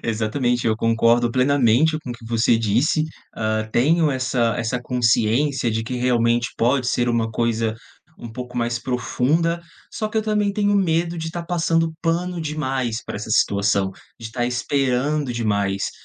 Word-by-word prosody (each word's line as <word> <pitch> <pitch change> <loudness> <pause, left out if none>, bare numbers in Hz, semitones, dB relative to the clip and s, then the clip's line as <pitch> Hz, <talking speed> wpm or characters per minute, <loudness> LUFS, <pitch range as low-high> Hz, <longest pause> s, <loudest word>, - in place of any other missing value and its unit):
Exatamente, 120 +2 -1
eu 110 -1 +2
concordo 115 +1 +2
plenamente 135 +3 +3
com 130 - -8
o - - -2
que 115 -1 -12
você 115 0 +2
disse, 115 +8 +1 0.3
hã, 110 0 -1
tenho 155 +7 +3
essa 125 -3 0
essa 120 +1 -2
consciência 120 +2 +1
de 110 +1 -1
que 120 +3 -5
realmente 120 -1 +2
pode 125 +2 +1
ser 120 0 +1
uma 115 -1 0
coisa 115 -1 0 0.4
um 115 - -8
pouco 125 +1 -7
mais 120 0 -1
profunda, 150 +7 0 0.3
só 215 - -3
que 220 - -6
eu - - 0
também 210 -2 0
tenho 205 0 +1
medo 170 -3 +1
de 160 0 -4
tá 175 - -5
passando 165 -1 0
pano 175 +1 -1
demais 135 -7 -2
pra - - -6
essa 110 +1 -6
situação, 100 -2 +2 0.3
de 115 - -7
estar 120 +2 -3
esperando 135 +2 0
demais. 100 -4 -1
125 Hz, 160 wpm, -22 LUFS, 115-155 Hz, 0.4 s, plenamente